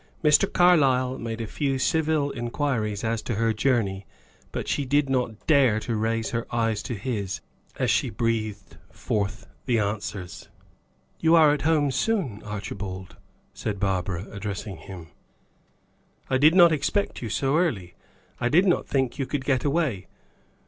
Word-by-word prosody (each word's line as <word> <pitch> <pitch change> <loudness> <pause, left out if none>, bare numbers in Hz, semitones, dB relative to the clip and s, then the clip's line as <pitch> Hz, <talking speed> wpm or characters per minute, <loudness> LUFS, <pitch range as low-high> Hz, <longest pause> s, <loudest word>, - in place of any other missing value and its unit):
Mr. 150 +6 +4
Carlyle 135 -8 +3
made 115 -1 -5
a - - -3
few 135 +4 -1
civil 155 0 +1
inquiries 120 -4 -2
as 115 -1 -1
to 115 - -3
her 115 +1 +1
journey, 105 -4 0 0.4
but - - -4
she 145 - 0
did 140 +1 +1
not 125 -4 -2
dare 135 -8 +4
to 115 +1 -3
raise 115 +1 -1
her 115 0 -3
eyes 115 -3 0
to 120 - -5
his, 100 -4 -3 0.4
as - - +1
she 130 - +1
breathed 110 -4 -3
forth 100 -2 -3 0.2
the 120 -2 +2
answers. 100 -3 -4 0.7
"You 165 +1 +4
are 155 -3 +6
at 145 - -2
home 150 -3 +2
soon, 150 - -1
Archibald," 100 -3 -6 0.4
said 105 -3 -4
Barbara, 95 -2 -1
addressing 100 -1 -5
him. 85 -3 -10 1.2
"I 130 - +3
did 155 +5 +6
not 175 -3 +8
expect 155 +7 -1
you 115 - -4
so 135 +7 +1
early. 100 - -1 0.5
I 120 - +1
did 175 +7 +4
not 180 - +1
think 130 -3 -1
you 135 - -1
could 140 -3 -3
get 130 -3 +1
away. 140 - 0
120 Hz, 155 wpm, -25 LUFS, 105-145 Hz, 1.2 s, not